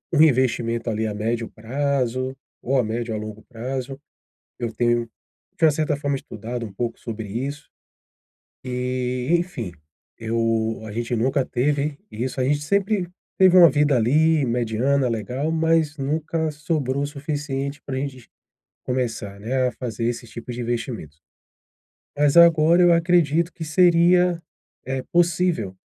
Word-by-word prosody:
um 155 - +5
investimento, 120 -5 +2
ali, 110 +1 -1
a 105 - -3
médio 115 +2 -2
prazo, 130 +1 -2 0.2
ou 135 +2 0
a 125 - +3
médio 115 +1 -3
ou - - -3
a - - -5
longo 110 0 -9
prazo, 130 +3 -5 0.6
eu 115 -2 -3
tenho 120 -1 +1 0.5
de 165 - -4
uma 160 - +8
certa 150 0 0
forma 145 -1 -1
estudado 115 +1 -6
um 100 - -10
pouco 115 +2 -3
sobre 110 -3 -6
isso. 135 +7 -5 1.0
Eh, 125 0 -2
enfim, 170 - -2 0.5
eu 115 -1 0
a - - -7
gente 120 +2 -2
nunca 130 +4 +1
teve 145 +3 -1
isso, 130 +4 -4
a - - +2
gente 145 +2 +1
sempre 200 +2 +1 0.3
teve 185 -1 +6
uma 170 -2 +10
vida, 145 -1 +3
ali, 150 +6 +3
mediana 120 +3 +1
legal 125 +8 -2
mas 160 -2 +2
nunca 155 +3 -1
sobrou 145 -3 -2
o - - 0
suficiente 145 -1 -4
pra 135 - -4
gente 130 -3 -5 0.6
começar, 115 -6 -3
né, 130 +3 0
a 125 - -2
fazer 115 -2 -4
esses 120 -1 -3
tipos 120 +1 -7
de 125 - -4
investimentos. 115 - -4 1.0
Mas 145 0 +3
agora 170 0 +6
eu 175 - +6
acredito 170 -1 +2
que 165 - -7
seria, 175 +1 +4 0.4
eh, 130 0 -2
possível, 170 - +1
130 Hz, 150 wpm, -23 LUFS, 115-150 Hz, 1.0 s, uma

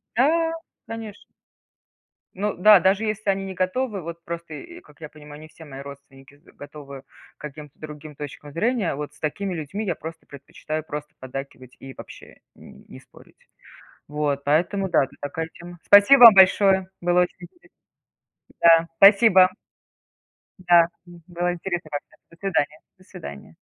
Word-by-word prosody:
Да, 325 +7 +2 0.3
конечно. 225 -2 -9 1.1
Ну 205 +2 -2
да, 210 +2 +7
даже 190 +4 +1
если 215 -1 -3
они 195 0 -1
не 190 - -6
готовы, 195 +3 -2
вот, 170 0 -9
просто 170 -2 -7
и, 345 - -11
как 385 - -22
я 155 - -8
понимаю, 150 -1 -13
они 155 - -12
все 160 +1 -15
мои 135 -2 -10
родственники 140 0 -14
готовы 145 -2 -11 0.4
к - - -23
каким-то 150 -1 -10
другим 150 -1 -10
точкам 145 0 -9
зрения, 215 - -1
вот 150 0 -7
с 145 - -22
такими 185 +5 -3
людьми 175 +7 -5
я 180 - -1
просто 160 +1 -10
предпочитаю 155 +2 -7
просто 150 -1 -8
поддакивать 130 -1 -9
и 135 0 -11
вообще - - -13 0.2
н - - -16
не 65 - -13
спорить. - - -21 0.7
Вот, 145 -1 -2
поэтому 180 +7 0
да, 140 - +3
это - - -19
такая 160 +3 -4
тема 175 0 -12
Спасибо 205 +7 +7
вам 230 - +11
большое, 190 0 +4
было 175 0 +2
очень 180 - -2
интересно. 180 - -16 0.9
Да, 165 0 +5
спасибо. 195 -2 +6 1.1
Да, 175 -2 +4 0.2
м, 175 -1 -15
было 175 0 -2
интересно 175 -2 -5
как-то. 145 0 -7 0.2
До 170 - -18
свидания, 160 -6 -2 0.2
до 185 - -21
свидания. 70 - -11
170 Hz, 155 wpm, -23 LUFS, 150-195 Hz, 1.1 s, вам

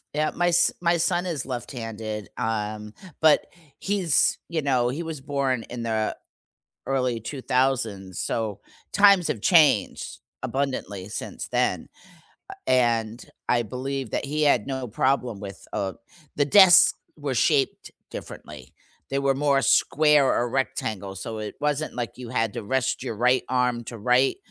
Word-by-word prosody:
Yup, 155 0 0
my 175 0 +1
s 175 0 +4
my 170 0 +3
son 175 +2 +1
is 160 -8 -3
left-handed, 115 -4 -6
um, 105 -2 -3 0.3
but 155 -1 +4 0.3
he's 190 -6 +1
you 165 -2 -2
know, 130 -4 +1
he 145 +7 -3
was 160 -3 -6
born 135 -3 -1
in 120 -1 -5
the 110 -1 -1 0.7
early 130 -3 0
'2000s, 120 - -1
so 105 -3 -2 0.3
times 200 -4 +5
have 110 - -2
changed 150 - +3 0.2
abundantly 130 -7 -3
since 110 - -6
then, - - 0 0.6
uh, - - -6
and 120 -3 +1 0.2
I 120 - +3
believe 130 +3 -4
that - - -2
he 150 +2 -2
had 145 -1 +3
no 130 -2 -4
problem 125 -1 0
with, 100 -1 -9
uh 95 -1 -2 0.4
the 145 - +2
desks 185 +3 +7 0.2
were 145 -4 -3
shaped 140 0 +1 0.2
differently, 70 -4 -10 0.4
they 135 - +1
were 140 -1 +1
more 140 -1 +2
square 150 0 +4
or 120 0 0
rectangle, 110 -7 -3
so 110 +4 -6
it 105 -1 -6
wasn't, 150 +1 -1
like, 120 -2 -4
you 125 -2 -8
had 115 -3 -1
to 120 -2 -5
rest 130 +4 -1
your 115 - -4
right 125 +3 +2
arm 125 -2 0
to 115 -1 -8
write 125 - +3
130 Hz, 150 wpm, -25 LUFS, 115-145 Hz, 0.7 s, desks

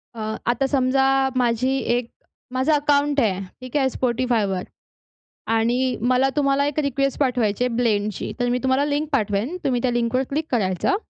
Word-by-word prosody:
अ, - - -8 0.3
आता 240 +3 +1
समजा 265 -1 +2 0.3
माझी 250 +2 +1 0.2
एक 245 -1 -4 0.4
माझं 260 +4 +1
अकाउंट 290 0 +2
आहे. 200 -7 +1 0.2
ठीक 255 +3 -3
आहे 270 -2 +3
Spotifyवर 235 -7 0 0.9
आणि 245 +3 +1
मला 255 +1 +3
तुम्हाला 280 -1 +2
एक 290 +1 -3
रिक्वेस्ट 275 -1 -1
पाठवायची 245 -5 +1
आहे 250 -2 -1
ब्लेंड 215 -4 +1
ची - - -5
तर 245 - +1
मी 245 +1 +1
तुम्हाला 260 +2 +2
लिंक 295 +1 -1
पाठवेन. 220 - 0
तुम्ही 250 -3 +1
त्या 255 - +1
लिंकवर 240 +1 0
क्लिक 310 +3 -1
करायचं. 195 - +1
255 Hz, 160 wpm, -22 LUFS, 235-275 Hz, 0.9 s, आहे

